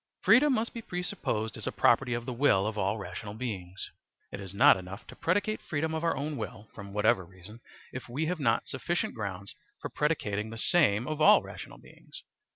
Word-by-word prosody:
Freedom 270 +6 +6
must 230 -2 0
be 230 - -6
presupposed 180 - -3
as - - -6
a - - 0
Property 125 -3 +3
of 120 0 -4
the 125 - -4
Will 115 -7 +3
of 110 0 -2
all 100 +1 0
Rational 105 0 -7
Beings 100 -6 -6 0.4
It - - -6
is 95 -2 -8
not 100 - +6
enough 95 +2 -8
to - - -12
predicate 205 +5 0
freedom 160 0 -2
of 160 +1 -2
our 165 -4 +1
own 145 +1 -3
will, 105 -1 -7
from 100 -2 -9
Whatever 100 -2 +2
reason, 95 +5 -14 0.3
if 130 -1 -7
we 145 +7 -1
have 175 +1 -2
not 115 -5 +1
sufficient 175 0 -2
grounds 100 -3 -5 0.3
for - - -5
predicating 110 -9 -1
the 115 - -7
same 120 -5 +3
of 155 0 -3
all 155 - +7
rational - - -9
beings. - - -14
115 Hz, 200 wpm, -29 LUFS, 100-160 Hz, 0.4 s, all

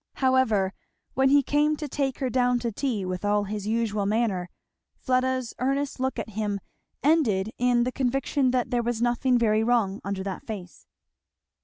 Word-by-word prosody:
However, 240 -8 +2 0.4
when 265 0 +3
he 285 0 +5
came 295 +3 +2
to 300 0 -5
take 270 -1 -2
her 265 -2 -1
down 250 0 +2
to 235 -1 -2
tea, 220 -4 -2
with 185 +1 -4
all 205 0 +2
his 205 0 -5
usual 215 -3 0
manner, 205 -5 0 0.5
Fleda's 255 -2 0
earnest 275 +2 -1
look 260 +1 -1
at - - -4
him 205 -1 -2 0.4
ended 225 -10 +2
in 245 -1 +3
the 250 - -1
conviction 270 +1 0
that 250 -1 0
there 245 -1 +2
was 235 -1 -2
nothing 245 +1 +2
very 220 -2 +2
wrong 225 -4 +1
under 200 -1 -3
that 195 -2 -5
face. 190 -5 -8
240 Hz, 170 wpm, -26 LUFS, 210-260 Hz, 0.5 s, he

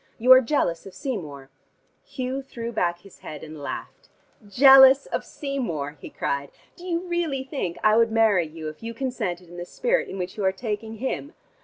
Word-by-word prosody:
You 250 +3 +3
are 260 0 +10
jealous 210 - -1
of 190 - -12
Seymour 155 - -6 0.3
" - - -43
Hugh 260 0 -2
threw 235 -3 -7
back 175 -6 -1
his 195 - -17
head 150 -2 -9
and 155 -1 -9
laughed. 140 - -7 0.4
"Jealous 265 +3 +8
of - - -3
Seymour?" 170 - -4
he - - -8
cried. 140 0 -3 0.3
"Do 355 - -13
you 340 -1 -1
really 335 -6 -1
think 265 - -4
I 215 0 +5
would 230 0 +3
marry 215 -7 +3
you 155 0 -8
if 155 0 -8
you 230 0 -6
consented 185 -9 -3
in 175 +1 -12
the 175 - -5
spirit - - -1
in - - -6
which 185 +1 -5
you 205 - -3
are 190 - +3
taking 220 +2 -5
him? 265 - -4
220 Hz, 195 wpm, -24 LUFS, 175-265 Hz, 0.4 s, are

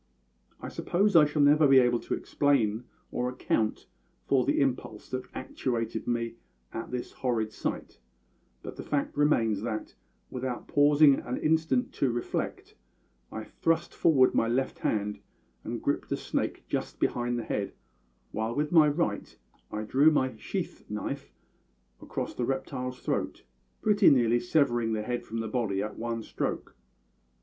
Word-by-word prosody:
I - - -6
suppose 200 +2 +1
I 155 -2 +9
shall 150 0 +1
never 150 +1 +6
be 135 -1 +7
able 120 -2 +4
to - - -2
explain 120 -6 +1 0.3
or 125 0 -1
account 115 -3 -1 0.4
for 135 -2 +3
the - - +1
impulse 125 -6 -1
that 130 0 -3
actuated 115 -4 -3
me 115 -1 -1 0.4
at 115 - -5
this 125 -1 -4
horrid 115 -4 -1
sight, - - -5 0.6
but - - -8
the - - -6
fact 145 -1 -1
remains 115 -9 +2
that, 110 -1 -4 0.4
without 125 -1 -4
pausing 145 0 +5
an 125 - -4
instant 155 -5 +1
to 135 - +1
reflect, 120 0 -3 0.6
I 110 - -5
thrust 165 +7 -1
forward 135 -6 +4
my 115 - +2
left 130 +3 -1
hand 105 -1 -1 0.4
and - - -4
gripped - - -1
the - - 0
snake - - -2
just - - -3
behind 120 0 0
the 120 - -3
head, 100 -2 -3 0.6
while 110 +2 -2
with 150 +1 0
my 160 -3 +7
right 150 +4 -1 0.3
I 105 0 -3
drew 135 +8 +5
my 130 -5 +1
sheath - - -5
knife - - -4 0.7
across - - -4
the 120 - -2
reptile's 130 -1 -3
throat, - - -2 0.4
pretty 205 -1 +6
nearly 120 -3 +4
severing 120 -9 +1
the 105 -1 -1
head 120 +2 -3
from 115 +1 -4
the 110 - -3
body 110 -4 -1
at 105 - -5
one 115 -1 -3
stroke. - - -4
125 Hz, 155 wpm, -29 LUFS, 115-145 Hz, 0.7 s, I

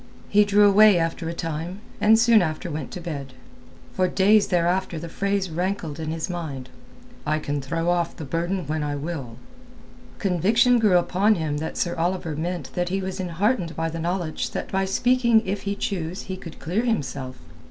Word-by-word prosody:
He 210 0 +5
drew 205 0 +5
away 205 -1 +7
after 165 0 -1
a - - -3
time, 165 +3 -4 0.2
and 220 +1 +6
soon 230 -1 +5
after 160 +1 -3
went 150 -2 -4
to - - -7
bed. 145 -6 -6 0.6
For 185 - +2
days 205 +3 +4
thereafter 175 0 0
the 165 +2 -6
phrase 195 0 -1
rankled 175 -2 -2
in 155 -1 -3
his 160 0 -3
mind—"I 160 - -6
can 145 -2 -3
throw 165 +5 -2
off 175 -1 +1
the 160 - -7
burden 175 +5 -2
when 155 +2 -2
I 145 -1 -2
will." 140 -6 -5 0.8
Conviction 215 +6 +3
grew 205 -5 +4
upon 195 +5 +2
him 155 -4 -2
that 160 +2 -4
Sir 175 - 0
Oliver 170 -2 -1
meant 170 -2 -4
that 175 0 -1
he 190 +2 -1
was 190 0 -4
enheartened 180 +1 0
by 165 0 -1
the 165 - -5
knowledge 170 -1 -2
that - - -4
by 190 0 +1
speaking 235 +2 +3
if 195 +2 -2
he 200 - -1
choose 185 -2 -3
he 190 - -5
could 170 -3 -10
clear 180 +7 -1
himself. 140 - -2
175 Hz, 185 wpm, -24 LUFS, 160-200 Hz, 0.8 s, away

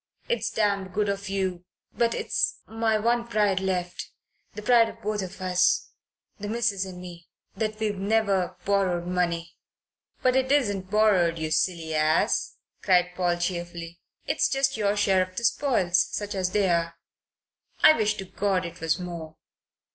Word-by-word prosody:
It's 480 - 0
damned 200 -3 -1
good 205 +1 0
of 200 0 -3
you 190 -2 -2 0.3
but 235 -1 +1
it's - - -1
my 225 -1 0
one 235 +2 0
pride 210 -4 +1
left 180 -2 -3 0.5
the 210 - -7
pride 230 0 +5
of 225 - -12
both 210 0 -1
of 190 0 -7
us 185 -1 +1 0.5
the 205 - -5
missus 215 -3 0
and 180 -1 -9
me 175 -1 -10 0.3
that 215 -1 -3
we've 210 -3 -1
never 195 -3 +1
borrowed 190 -3 +1
money 170 -2 -2 0.3
" - - -39
"But 255 0 +3
it 265 0 +1
isn't 205 -10 +1
borrowed, 195 -5 +3
you 155 -1 -3
silly 165 -1 0
ass," 155 +1 +1 0.3
cried 180 -2 +3
Paul 175 -1 +1
cheerfully. 175 -1 -4 0.3
"It's - - +1
just 270 0 +1
your 210 -1 0
share 195 -2 +3
of 185 0 -4
the 235 - -3
spoils, 230 -8 +2
such 205 +1 -2
as 185 -2 -1
they 200 0 +1
are. 170 -1 0 0.9
I 310 - +9
wish 215 -5 +1
to 195 - -6
God 190 -1 -1
it 170 0 -9
was 165 0 +1
more." 170 -3 -7
190 Hz, 165 wpm, -26 LUFS, 175-215 Hz, 0.9 s, I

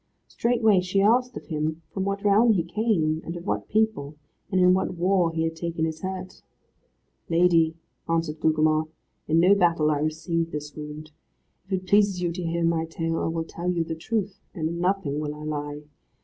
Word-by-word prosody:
Straightway 225 -5 +2
she 185 +2 0
asked 245 +5 +3
of - - -9
him 155 0 -3
from 190 -1 -2
what 200 0 -2
realm 215 +3 +5
he 175 -5 +1
came, 170 -5 0
and 170 +1 -5
of 170 - -9
what - - -2
people, 215 -10 0 0.4
and 185 - +2
in 180 0 +6
what 185 -1 0
war 180 -1 +2
he 160 0 -1
had 165 0 -2
taken 165 -1 -2
his 160 -1 -4
hurt. 185 -1 -6 0.9
"Lady," 165 -1 +3 0.3
answered 165 -2 -1
Gugemar, 155 0 +2 0.4
"in 160 +1 +3
no 180 +4 +6
battle 170 -5 +3
I 145 - 0
received 165 +2 -1
this 150 0 -6
wound. 150 0 -8 0.6
If 195 - -5
it 185 0 -2
pleases 200 -1 +3
you 175 -1 -1
to 180 +2 -5
hear 170 0 -1
my 165 -1 +1
tale 165 0 -2
I - - -1
will 165 0 -2
tell 170 +2 -5
you 175 -2 +1
the 165 - -4
truth, 200 +3 -3 0.2
and 160 -3 -1
in 170 +1 -4
nothing 180 -6 0
will 150 -1 -3
I 150 - -9
lie. 145 -1 -4
170 Hz, 195 wpm, -25 LUFS, 160-190 Hz, 0.9 s, in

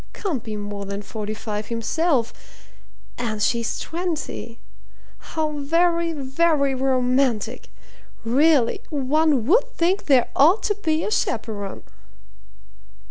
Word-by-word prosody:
Can't 335 - -3
be 220 -2 -5
more 205 -1 -5
than 200 +1 -5
forty 215 0 -5
five 210 -1 -4
himself, 235 +2 0 0.9
and 220 -3 -2
she's 230 +2 0
twenty 320 -8 -4 0.6
how 315 -1 -3
very, 335 +3 +2
very 280 0 +1
romantic! 255 -3 0 0.5
Really, 270 +1 +3
one 290 -2 +1
would 450 - +4
think 360 +4 +1
there 265 -4 +4
ought 335 +10 +5
to 415 - +1
be 315 0 +1
a - - -2
chaperon!'" 205 - -2
270 Hz, 110 wpm, -23 LUFS, 230-320 Hz, 0.9 s, ought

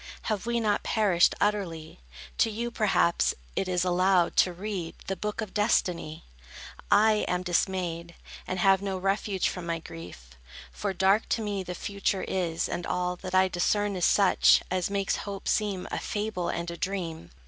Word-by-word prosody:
Have 215 0 -2
we 235 0 +1
not 210 -2 +1
perished 195 -6 +3
utterly? 180 -7 -2 0.4
To - - +4
you, 235 +2 -3
perhaps, 200 -6 +2 0.2
it 195 - -1
is 180 -1 +1
allowed, 180 0 +3
to 180 - +5
read 180 -2 -5
The 195 - -2
book 210 +3 -4
of 215 -3 -6
destiny. 175 -7 0 0.7
I 215 +1 +4
am 180 0 -1
dismayed, 175 -2 -1 0.3
And 185 - -2
have 195 +1 +4
no 195 -1 -2
refuge 195 +1 0
from 180 -2 -5
my 165 0 -1
grief; 160 - -11 0.4
For 60 - -3
dark 195 +3 +2
to 225 - 0
me 205 -2 -2
the 180 -1 -6
future 200 0 -2
is, 170 -3 -1
and 175 - -4
all 180 0 -1
That 185 0 -5
I 190 0 +5
discern 200 +3 0
is 180 - +1
such, 195 -3 +5
as 185 0 0
makes 200 -1 0
hope 200 -1 -6
seem 200 -4 0
A - - -2
fable 205 -4 -3
and 170 0 -3
a 170 - -7
dream. 170 - -4
190 Hz, 170 wpm, -28 LUFS, 175-205 Hz, 0.7 s, to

